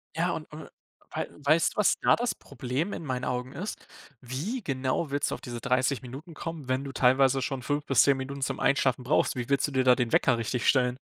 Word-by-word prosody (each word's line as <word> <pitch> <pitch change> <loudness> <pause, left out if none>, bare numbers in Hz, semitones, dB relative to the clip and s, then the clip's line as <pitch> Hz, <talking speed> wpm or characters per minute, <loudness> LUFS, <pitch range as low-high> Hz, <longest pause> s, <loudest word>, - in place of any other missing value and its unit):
Ja - - +1
und - - -7
und - - -9 0.4
wei - - -3 0.2
weißt 155 +3 +3
du, - - -23
was 210 - +4
da - - +5
das 240 0 -1
Problem 135 +10 -4
in - - -5
meinen 130 -2 -2
Augen 125 0 -3
ist? 200 +5 -6 0.3
Wie 155 - -4
genau 135 0 -1
willst 145 0 0
du - - -1
auf - - -12
diese 120 -2 -6
30 130 +1 +1
Minuten 140 +7 -9
kommen, 160 -4 -6
wenn 130 +1 0
du 140 - -6
teilweise 135 +1 +3
schon 135 -1 -3
5 145 +2 -1
bis 135 - +5
10 140 -1 +3
Minuten 135 +1 -6
zum 135 0 -2
Einschlafen 130 -2 +2
brauchst? 135 +1 +2
Wie 125 +1 -4
willst 140 - +2
du 145 - -7
dir 130 -1 +2
da 125 -1 +6
den 120 -3 -1
Wecker 130 -3 +4
richtig 115 +2 -2
stellen? 125 -2 +3
135 Hz, 230 wpm, -28 LUFS, 125-145 Hz, 0.4 s, da